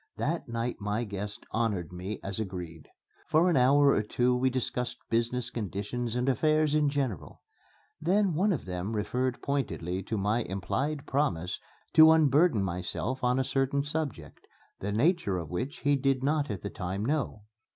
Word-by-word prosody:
That 160 -2 -1
night 115 +1 -2
my 105 +3 -1
guests 105 -1 -5
honored 105 -8 -1
me 95 +4 -5
as 100 +2 -4
agreed. 90 -6 -6 0.4
For 165 +3 +4
an - - +2
hour 140 +2 +5
or 105 - +3
two 125 +4 +1
we 130 +1 +2
discussed 125 -1 -2
business 120 +1 0
conditions 110 +2 -3
and 125 +1 0
affairs 155 +3 +2
in 150 -1 +3
general. 135 - -3 0.6
Then, 190 +3 +2
one 195 +7 +2
of 155 - -2
them 90 +4 -3
referred 125 +4 -1
pointedly 95 -10 -2
to 110 +3 -3
my 105 +4 +1
implied 130 +10 -2
promise 90 - -1 0.3
to 160 0 +9
unburden 155 - +4
myself 95 +8 -3
on 125 +1 +3
a 130 - +2
certain 135 +1 0
subject, 150 -2 -5 0.3
the 100 - -3
nature 120 - +2
of 80 -4 -5
which 125 - -4
he 145 0 +3
did 135 -1 +1
not 145 0 +1
at 100 -3 -4
the 100 - -4
time 95 +3 -3
know. 135 -6 -1
125 Hz, 165 wpm, -29 LUFS, 100-145 Hz, 0.6 s, to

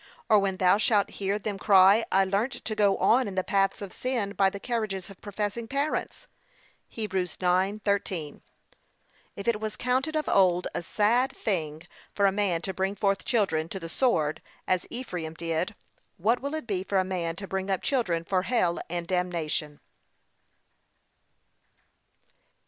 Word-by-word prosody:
or 215 -2 +7
when 195 -1 -1
thou 185 +2 +4
shalt 210 -3 +2
hear 195 +1 +1
them 205 -1 -4
cry, 200 +2 +6
I 195 0 +4
learnt 200 +7 0
to 220 - -2
go 205 -2 +3
on 250 +1 +3
in 195 - -6
the 185 - +1
paths 195 +1 +1
of 195 - -7
sin 240 -6 -1
by 195 -2 +3
the 200 - -7
carriages 210 -5 -3
of 195 - -15
professing 210 +2 -3
parents. 285 - -2 0.6
(Heb. 215 -3 -4
9:13) 185 -2 -1 0.9
If 200 - -7
it 230 -3 +2
was 215 0 -4
counted 260 +5 0
of 305 -1 -1
old 180 -2 +3
a - - -2
sad 225 +8 +2
thing 160 -6 -2 0.3
for 200 - +3
a 195 - +5
man 190 -4 0
to 190 - -2
bring 190 +2 -1
forth 195 0 0
children 170 -9 +1
to 195 - -5
the 165 -2 -7
sword, 165 - +1 0.3
as 185 -1 0
Ephraim 175 -10 -5
did, 165 +4 -2 0.4
what 220 +7 +2
will 280 +3 -3
it 315 - -4
be 195 -5 -2
for 195 0 -1
a 190 - +4
man 175 -3 -2
to 195 +2 -7
bring 190 0 -3
up 190 - -1
children 185 -12 0
for 185 +1 +1
hell 185 -5 +1
and 175 0 -3
damnation? 170 -5 -2
195 Hz, 165 wpm, -27 LUFS, 180-215 Hz, 0.9 s, or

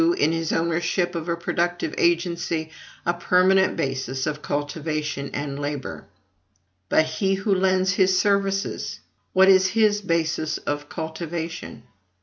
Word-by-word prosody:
In 335 - +3
his 165 -1 -1
ownership 170 +2 0
of 170 0 -4
a 170 - 0
productive 175 +1 -1
agency, 170 -2 0 0.3
a 175 - +2
permanent 185 +2 +3
basis 130 -1 -2
of 150 0 -3
cultivation 145 -1 -3
and 145 -1 -4
labor. 145 -2 -4 0.8
But 155 - +4
he 190 +5 0
who 195 +1 0
lends 185 0 +2
his 185 -1 +3
services, 195 0 0 0.3
what 190 0 +6
is 190 0 +6
his 210 +1 +2
basis 165 -4 0
of 145 0 -4
cultivation? 165 -3 -5
170 Hz, 130 wpm, -24 LUFS, 155-190 Hz, 0.8 s, what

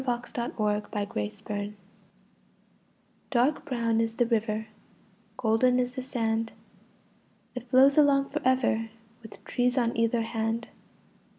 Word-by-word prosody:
[Pg 245 -2 -2
17] 235 -1 -4
WHERE 210 -1 +1
GO 205 0 -4
THE - - -2
BOATS? 205 - -4 1.6
Dark 265 +3 +1
brown 230 -4 0
is 225 0 -2
the 240 - +2
river, 220 -2 0 0.7
Golden 250 +1 +3
is 250 0 -1
the 260 - -4
sand. 225 -3 -1 1.0
It 250 -1 -6
flows 270 +3 +5
along 275 -2 +4
for 305 +2 -2
ever, 245 -3 +2 0.3
With 220 - -13
trees 250 +1 0
on 235 -2 +1
either 230 0 +1
hand. 225 0 -2
235 Hz, 130 wpm, -28 LUFS, 225-255 Hz, 1.6 s, flows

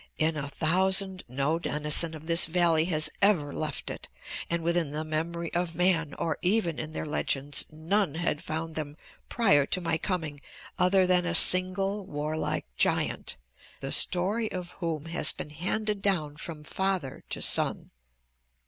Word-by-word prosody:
In 160 +1 +1
a 145 -2 -4
thousand 190 +5 +1
no 140 +6 -1
denizen 150 +1 +2
of 155 0 -11
this 165 0 +3
valley 165 -2 +2
has 155 -3 0
ever 175 -8 +2
left 155 -3 -4
it, - - -9 0.4
and 170 -1 -1
within 170 -2 0
the 150 +2 -4
memory 165 +2 -4
of 175 -1 -2
man, 170 -4 +1
or 165 - -3
even 180 -4 0
in 155 0 -5
their - - -4
legends, 145 -2 -1
none 160 +2 -1
had 165 -2 -2
found 160 -1 -4
them 150 -1 -5 0.3
prior 145 - +3
to - - 0
my 165 -2 -1
coming 155 -7 -4 0.4
other 185 +1 +4
than 180 -1 +2
a 175 - +1
single 195 +3 +6
warlike 150 +2 -3
giant, - - 0 0.4
the - - -5
story 205 +5 0
of 180 -1 -6
whom 165 -4 -3
has 165 -2 0
been 150 - -8
handed 205 +6 -2
down 155 -8 0
from 155 0 -8
father 190 -5 -3
to - - -4
son. - - +1
165 Hz, 155 wpm, -28 LUFS, 155-185 Hz, 0.4 s, single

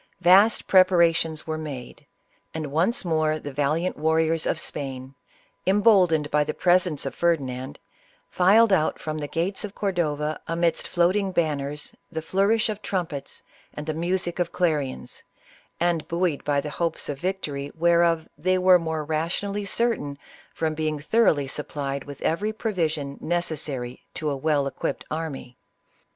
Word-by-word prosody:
Vast 195 +5 +5
preparations 170 -4 +3
were 155 0 -3
made, 140 -6 -8 0.5
and 155 -3 -4
once 190 - +1
more 155 -2 +1
the 145 -2 -7
valiant 150 +6 0
warriors 160 +1 +1
of 155 - 0
Spain, 135 -3 -5 0.5
emboldened 190 -7 +4
by 150 0 +3
the 155 +1 -4
pres 180 0 +3
ence 150 -5 -4
of 135 - -3
Ferdinand, 135 -5 -1 0.5
filed 205 +4 +4
out 155 -4 +2
from 155 0 -4
the 145 - -4
gates 175 +6 -2
of 205 -1 -6
Cordova 155 -6 -1
amidst 165 0 0
floating 190 +3 +1
banners, 150 -4 -2 0.2
the 160 -1 -4
flourish 200 +6 +2
of 210 -1 -4
trumpets, 175 -9 -4 0.3
the 150 +1 -3
music 175 +2 -2
of 175 -1 0
clarions, 150 -8 -2 0.6
and 170 -2 0
buoyed 170 -3 -1
by 145 -1 +1
the 150 +1 -4
hopes 165 0 -2
of 145 -2 -4
victory, 145 -7 -3
whereof 170 -1 +3
they 185 +5 +1
were 185 0 +6
more 160 -2 -2
rationally 180 +6 -2
certain 200 -10 -1 0.3
from 160 -1 -1
being 155 -1 -1
thoroughly 150 -3 +2
supplied 140 -1 -4
with 145 -1 -9
every 205 +7 0
provision 160 -10 -2
necessary 150 -7 -2
to 155 -2 -1
a - - -1
well 145 0 +1
equipped 135 - -3
army. 150 -6 -5
160 Hz, 145 wpm, -25 LUFS, 150-180 Hz, 0.6 s, were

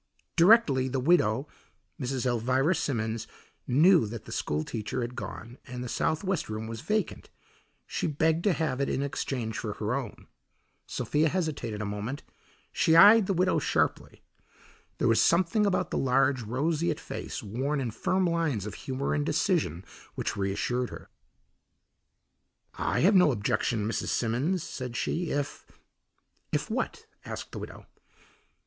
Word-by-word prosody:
Directly 170 - +5
the 130 0 -1
widow, 135 -3 +2 0.5
Mrs. 130 0 -2
Elvira 130 +6 +2
Simmons, 115 -8 -2 0.4
knew 155 - +5
that 110 +1 -7
the - - -10
school 75 +1 -1
teacher 110 +5 -4
had 120 +1 -4
gone 120 0 -7
and 125 -1 -6
the - - -5
southwest 160 - -1
room 110 +1 -4
was 115 0 -6
vacant, 215 -3 -2 0.6
she - - -2
begged 160 +2 +1
to 200 - +4
have 145 -6 -1
it 140 - 0
in 135 - 0
exchange 130 -5 -3
for 105 -2 -3
her 105 +2 -2
own. 125 -5 -5 0.6
Sophia 155 +2 +1
hesitated 145 - -2
a - - -3
moment; 105 +7 -4 0.5
she 160 - +3
eyed 205 +4 +8
the 195 - +1
widow 185 +2 +2
sharply. - - -1 0.7
There - - +1
was 115 -1 +4
something 185 +5 +3
about 185 -2 0
the - - 0
large, 135 0 +2
roseate 150 +9 -1
face - - -6
worn 130 +8 -2
in 125 -4 -2
firm 185 - 0
lines 165 - 0
of 105 - -5
humour 135 +1 -3
and 145 - +1
decision 150 - 0 0.3
which - - -2
reassured 105 +6 -1
her. - - -11 1.6
"I - - -1
have 195 +6 +5
no 180 -5 +6
objection, 105 -1 0
Mrs. 115 - -2
Simmons," 135 +10 0
said 125 -6 -6
she, 170 -1 -1
"if 145 0 -3 0.4
" - - -45
"If - - -1
what?" - - -3 0.2
asked - - -7
the - - -6
widow. - - -9
135 Hz, 150 wpm, -28 LUFS, 115-165 Hz, 1.6 s, eyed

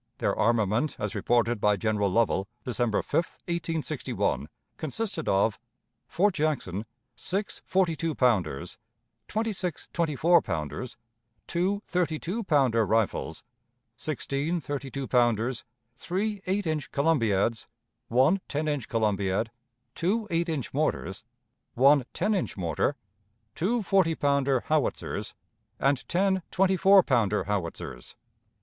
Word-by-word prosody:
Their - - 0
armament, 115 +5 +1
as 105 -1 -3
reported 120 -2 +1
by 105 0 +4
General 105 -1 +1
Lovell, 100 -1 +1 0.2
December 120 -3 0
5, - - -20
1861, 165 -3 -2 0.3
consisted 160 +2 -3
of 100 +2 +2 0.5
Fort 200 +3 +2
Jackson: 115 - -1 0.3
six 195 +9 -2
forty 185 -3 +2
two 160 0 -2
ponders, 105 - +1 0.5
twenty 220 0 -1
six 180 -5 -4
twenty 165 -4 0
four 170 +4 +5
pounders, 80 - -4 0.5
two 190 +4 0
thirty 175 -3 0
two 200 +9 -3
pounder 135 - +3
rifles, 110 -1 0 0.5
sixteen 150 +6 -2
thirty 140 -3 -4
two 135 0 -4
pounders, 120 0 +1 0.3
three 200 +7 -2
eight 195 +1 0
inch 155 -3 -2
columbiads, 115 -8 +1 0.4
one 135 +11 +3
ten 155 +1 -2
inch 145 -6 -1
columbiad, 105 -1 0 0.4
two 210 +6 0
eight 170 +1 +1
inch 150 -6 -3
mortars, 140 -9 -1 0.5
one 140 +1 +5
ten 215 - 0
inch 190 - -2
mortar, 85 - 0 0.6
two 220 - 0
forty 185 -4 +3
pounder 140 -3 +2
howitzers, 155 -2 -1 0.4
and 135 -1 +1
ten 190 +1 +2
twenty 190 0 +2
four 195 +1 +6
pounder 110 -8 +2
howitzers. 85 - -4
140 Hz, 120 wpm, -27 LUFS, 115-175 Hz, 0.6 s, four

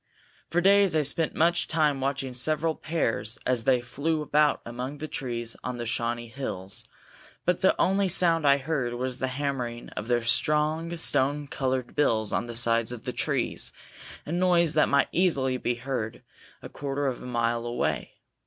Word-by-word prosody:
For 175 - +1
days 195 -1 +5
I 155 - +3
spent 155 +3 0
much 170 +2 +2
time 150 -4 +1
watching 135 -1 -2
several 155 +5 +1
pairs 115 -10 -2
as 125 -3 0
they 130 -2 +4
flew 150 +5 -2
about 150 0 +3
among 125 +4 -5
the 155 - -5
trees 120 -6 -3
on 125 -1 -4
the 120 - -4
Shawnee 120 +1 -2
Hills, 105 -6 -6 0.6
but 180 0 +1
the 190 - +3
only 195 +1 +3
sound 170 -3 +3
I 140 0 +6
heard 135 -4 -2
was 125 +1 -3
the 130 - 0
hammering 130 -3 -3
of 105 - -6
their 120 -1 +1
strong 155 +6 +1
stone 145 -2 +2
colored 130 -2 -2
bills 110 -7 +1
on 120 - -1
the 120 - -7
sides 115 -1 +2
of 120 -2 -7
the - - -4
trees, - - 0 0.5
a - - -6
noise 175 -2 +3
that 155 - +3
might 140 -1 +3
easily 140 -8 +1
be 120 -1 -1
heard 120 -3 -4 0.4
a - - -6
quarter 140 0 -3
of 130 -3 -2
a - - -9
mile 120 -1 0
away. 120 - -2
135 Hz, 175 wpm, -27 LUFS, 120-155 Hz, 0.6 s, I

